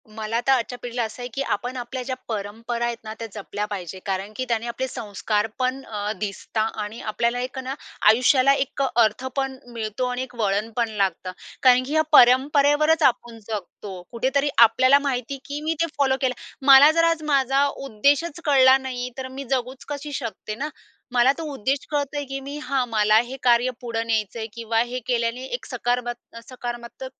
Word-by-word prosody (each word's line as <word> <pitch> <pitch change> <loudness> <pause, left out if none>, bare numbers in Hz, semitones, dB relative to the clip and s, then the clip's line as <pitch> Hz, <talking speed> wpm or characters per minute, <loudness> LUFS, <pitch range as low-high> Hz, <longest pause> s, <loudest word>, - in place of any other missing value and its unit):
मला 220 +1 -2
तर - - +5
आजच्या 245 -1 +1
पिढीला 240 0 -2
असं 225 +2 -6
आहे, 245 - -4
की 275 - -2
आपण 245 +2 -2
आपल्या 250 +1 -5
ज्या 260 +1 -3
परंपरा 230 +3 -3
आहेत 235 -1 -2
ना, 215 0 -6
त्या 230 - -5
जपल्या 205 0 -4
पाहिजे. 190 -3 -6
कारण 195 +1 -3
की 255 - -3
त्याने 230 0 0
आपले 255 +3 -3
संस्कारपण 225 +4 -2
अ, 210 -1 -3
दिसता 210 +2 -3 0.2
आणि 210 +3 -7
आपल्याला 235 +3 -1
एक 255 +1 -4
ना 260 +1 -4 0.4
आयुष्याला 255 +4 +5
एक 275 0 -2
अर्थपण 260 +2 0 0.2
मिळतो. 220 +2 -3
आणि 250 0 -2
एक 250 -1 -11
वळणपण 220 +2 0
लागतं. 195 -3 -1 0.3
कारण 255 -1 +6
की 285 - -5
या 315 - +4
परंपरेवरच 290 +4 +5
आपण 240 -3 +1
जगतो. 200 -2 -6
कुठेतरी 270 +4 0
आपल्याला 255 +4 +6
माहिती 275 -1 -2
की 285 +1 -5
मी 320 +1 0
ते 335 - +4
फॉलो 265 -2 +2
केलं. 260 -2 +1 0.3
मला 275 +2 +9
जर 330 +1 +2
आज 330 -2 +2
माझा 275 -1 +2
उद्देशच 280 +5 0
कळला 265 -3 +6
नाही 255 -2 -5
तर 260 -1 -4
मी 265 +1 -7
जगूच 255 0 -2
कशी 290 0 -5
शकते 215 -4 -5
ना. 290 +7 -4 0.4
मला 245 +1 +5
तो 330 - -5
उद्देश 270 +2 -1
कळतोय, 290 0 -1
की 270 0 -3
मी 280 +2 -7
हा 265 -1 0
मला 215 -2 +3
हे 265 - -6
कार्य 240 0 +4
पुढं 230 -2 -3
न्यायचं 220 0 -1
आहे 220 - -4
किंवा 230 0 -1
हे 250 +1 -3
केल्याने 240 0 -1
एक 245 - -4
सकारमत् 245 -1 -3
सकारात्मक 240 0 -7
245 Hz, 180 wpm, -23 LUFS, 225-270 Hz, 0.4 s, मला